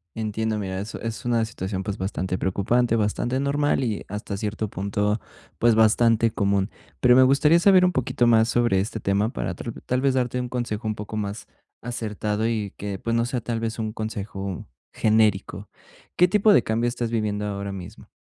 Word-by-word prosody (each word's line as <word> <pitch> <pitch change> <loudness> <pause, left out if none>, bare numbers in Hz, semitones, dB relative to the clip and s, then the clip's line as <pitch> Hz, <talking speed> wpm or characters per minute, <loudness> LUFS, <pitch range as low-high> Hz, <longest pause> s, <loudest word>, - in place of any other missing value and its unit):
Entiendo. 110 0 -2
Mira, 95 -1 -3
eso 105 +3 -6
es 115 +1 -5
una 115 -2 +2
situación, 95 -3 -4
pues, 100 +1 -4
bastante 95 -1 -2
preocupante, 115 +5 +1
bastante 115 +4 0
normal, 140 0 +1
y 110 -4 -2
hasta 105 0 -5
cierto 105 0 -3
punto, 105 +2 -1 0.4
pues, 120 -1 +4
bastante 115 0 +4
común. 100 -1 0 0.3
Pero 125 -1 +5
me 130 - +7
gustaría 150 +5 +5
saber 185 0 +6
un 180 - +4
poquito 120 -3 +1
más 115 -1 +5
sobre 120 -5 +2
este 110 +3 -3
tema 100 +3 +1
para - - -4
tra 115 - -6
tal 125 +1 0
vez 135 -1 +2
darte 125 -1 0
un 125 -1 -3
consejo 115 -3 -3
un 110 - -1
poco 105 +1 -6
más 100 0 -4 0.3
acertado, 110 -2 -2
y 110 -4 -2
que, 100 -1 -5
pues, 115 0 -1
no 115 0 +2
sea 125 -1 -2
tal 115 0 -3
vez 115 0 -3
un 110 -1 -2
consejo 100 -4 -5 0.3
genérico, 110 -3 +1 0.5
¿qué 180 - +5
tipo 210 +2 +4
de - - +6
cambio 115 +2 0
estás 120 -1 -2
viviendo 105 -2 -1
ahora 100 0 -4
mismo? 90 -3 -9
110 Hz, 190 wpm, -24 LUFS, 105-120 Hz, 0.5 s, me